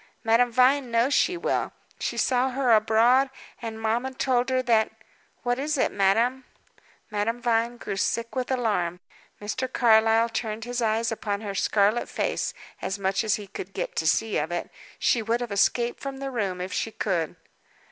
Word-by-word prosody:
"Madame 235 +2 +3
Vine 255 +2 +3
knows 235 +4 +2
she 355 +4 +2
will. - - -1 0.3
She - - -3
saw 255 0 +2
her 260 -1 +1
abroad; 230 +5 +4 0.3
and 225 -2 -5
mamma 230 +4 -1
told 255 -1 +1
her 255 0 +1
that 225 -3 +3 0.5
what 245 +1 0
was 295 +2 -1
it, - - +1
madame?" 230 +7 +2 0.7
Madame 210 +3 -1
Vine 235 0 0
grew 200 - -5
sick 230 +5 -1
with 255 -1 -2
alarm. 205 -9 0 0.4
Mr. 255 +5 -3
Carlyle 225 -1 +4
turned 225 -1 -3
his 245 0 -3
eyes 225 0 +1
upon 205 -2 -3
her 205 -2 -4
scarlet 205 +4 +1
face - - -1 0.3
as 195 - -2
much 195 +1 0
as 215 -1 +2
he 210 - -7
could 195 -1 -8
get - - -3
to 160 - 0
see 220 +7 +2
of 155 +3 -3
it. 175 - -3 0.3
She 235 - +2
would 225 +2 0
have 240 -3 -5
escaped 235 +4 +1
from 275 -1 -5
the 270 0 -5
room 195 -7 -2
if 185 0 -5
she 225 - -1
could. 175 -7 -2
230 Hz, 175 wpm, -26 LUFS, 210-245 Hz, 0.7 s, abroad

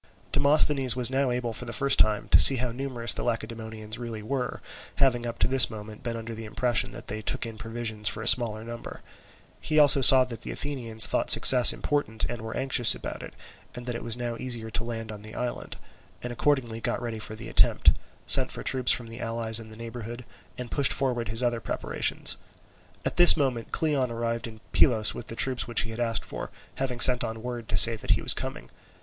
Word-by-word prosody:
Demosthenes 140 -3 +2
was 125 0 -1
now 135 0 -1
able 120 -1 -4
for 125 - -8
the 120 - -8
first 140 0 +1
time 105 -1 0
to - - +5
see 135 - +10
how 125 -1 -4
numerous 120 -2 -2
the - - -6
Lacedaemonians 110 -1 -6
really 115 -3 -8
were, 125 +2 -5 0.4
having 120 -3 0
up 115 0 -7
to - - 0
this 130 -1 +3
moment 105 -1 -11
been 115 -1 -6
under 115 0 -9
the 110 0 -10
impression 120 +2 -2
that - - -12
they 110 +1 -7
took 115 - -1
in 115 -1 -9
provisions 115 -3 -2
for 105 - -7
a - - -6
smaller 110 -3 +2
number; 115 0 -11 0.6
he 155 - -4
also 145 -2 +4
saw 130 0 +8
that 120 -3 -10
the - - -8
Athenians 120 -6 -2
thought - - -2
success 125 -2 +8
important 145 -7 -4
and 120 -2 -8
were 110 0 -8
anxious 130 -3 +4
about - - -9
it, - - -12 0.4
and 120 - -10
that 125 - -5
it 120 - -8
was 115 0 -2
now 120 -1 -5
easier 115 -3 -5
to 105 +3 -3
land 115 -1 -7
on 105 -1 -11
the 110 +1 -13
island, 125 -1 -7 0.5
and 120 0 -6
accordingly 120 -4 -2
got - - -3
ready 115 -2 -7
for 110 0 -9
the 110 +1 -11
attempt, - - +2 0.3
sent - - +5
for - - -9
troops 130 -2 +1
from 120 - +1
the 115 +1 -12
allies 115 -1 +1
in 110 -1 -12
the 110 - -15
neighbourhood, 115 +1 -10 0.3
and 125 -2 -9
pushed 140 -2 +2
forward 125 -4 -3
his 115 +4 -5
other 120 -1 -2
preparations. 95 - -1 0.7
At - - -4
this 175 -1 +9
moment 130 -6 -3
Cleon 145 -5 -2
arrived 115 0 -5
at 110 -1 -16
Pylos 110 -5 +3
with 120 - -10
the 115 - -8
troops 130 +1 -2
which 120 - +1
he 115 - -7
had 115 - -9
asked 115 -2 -3
for, - - -9 0.3
having 130 -2 -5
sent 125 0 +7
on 115 -1 -7
word 120 -2 -8
to 105 - -2
say 115 +3 +7
that - - -12
he - - +1
was - - +3
coming. - - -8
120 Hz, 220 wpm, -24 LUFS, 115-125 Hz, 0.7 s, see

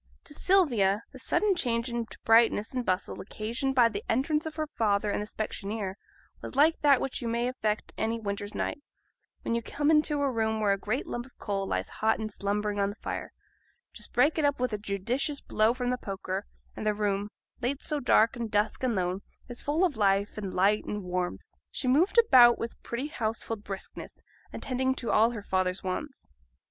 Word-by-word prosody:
To 295 - -10
Sylvia 235 - +3
the - - -11
sudden 420 -2 +2
change 240 -8 0
into 235 -2 -4
brightness 225 -1 +4
and 250 -1 -1
bustle 185 -3 -1
occasioned 235 +7 -3
by 245 -3 +6
the 210 -2 -4
entrance 300 +6 +1
of 315 - -7
her 310 -1 -1
father 210 -7 0
and - - -1
the 210 - -5
specksioneer 210 -2 -4 0.5
was - - -7
like 310 +4 +4
that 280 -3 +5
which 270 - -3
you 235 - -3
may 235 +1 0
effect 215 -4 -2
any 225 +1 0
winter's 205 -1 -4
night, 290 - -2 0.6
when - - -1
you 235 - 0
come 290 +6 0
into 300 -2 +3
a 275 - +1
room 220 -2 0
where 210 -2 +2
a - - -1
great 250 - -2
lump 240 +1 -5
of 260 - -24
coal 195 -1 -2
lies - - -1
hot 220 +1 +1
and 215 -1 -4
slumbering 205 +1 -1
on 200 0 +2
the 205 - -7
fire; - - -5 0.6
just - - -5
break 310 +2 +3
it - - +1
up 285 -2 +2
with 250 -2 0
a 210 - -2
judicious 235 +9 -1
blow 215 +1 +2
from 250 0 -1
the 250 - -1
poker, 195 - -4 0.3
and - - -6
the 210 -1 +1
room, 205 -1 -1 0.3
late 260 +3 -1
so 300 - -1
dark, 230 -3 +4
and 235 -2 -4
dusk, 210 +1 0
and 250 -3 +1
lone, 185 +1 -1 0.3
is 245 -1 -6
full 310 +6 +2
of 325 -7 -1
life, 200 -1 +2
and 200 -3 -4
light, 200 +4 +3
and 210 -1 -4
warmth. 180 0 -3 0.2
She 255 - -3
moved 310 - +3
about 250 - +7
with 230 - -6
pretty 235 +4 -4
household 225 -3 -3
briskness, 195 -2 -7 0.3
attending 260 0 -1
to 235 - -3
all 220 +2 +5
her 225 -4 -6
father's 185 -1 -1
wants. 265 +10 -4
230 Hz, 200 wpm, -28 LUFS, 205-260 Hz, 0.6 s, about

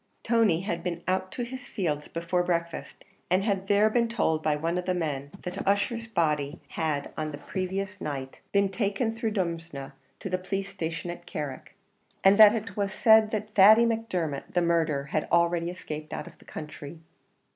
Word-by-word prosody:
Tony 220 -8 +3
had 170 -3 -3
been 175 -1 -4
out 185 0 0
to 245 - -3
his 255 +2 -6
fields 155 - -2
before 170 +2 -1
breakfast, 170 -1 -3 0.3
and 185 +2 +3
had 195 -2 -1
there 205 +1 +5
been 235 +1 +2
told 160 -9 +1
by 155 -1 +1
one 165 +4 -1
of 180 - -5
the 185 - 0
men 145 -5 -2
that 180 +1 -4
Ussher's 230 +4 +1
body 150 -7 0
had 150 -3 -2
on 155 0 -2
the 145 - -6
previous 190 +4 -4
night 135 -3 -5
been 200 -1 +3
taken 205 +3 -1
through 225 0 -2
Drumsna 165 -8 -3 0.3
to - - -5
the 185 -1 -1
police 195 +1 -3
station 175 -2 -4
at 175 0 -10
Carrick, 145 -4 -6 0.5
and 195 +2 +6
that 215 0 +9
it 225 0 -5
was 200 -2 -1
said 220 0 +5
that 215 -1 -4
Thady 215 +4 +8
Macdermot, 185 -11 -2
the 175 - +4
murderer, 165 -4 +1
had 145 +2 -2
already 170 0 +3
escaped 155 -4 -7
out - - -4
of - - -14
the - - -19
country. 150 0 -8
180 Hz, 185 wpm, -28 LUFS, 160-205 Hz, 0.5 s, that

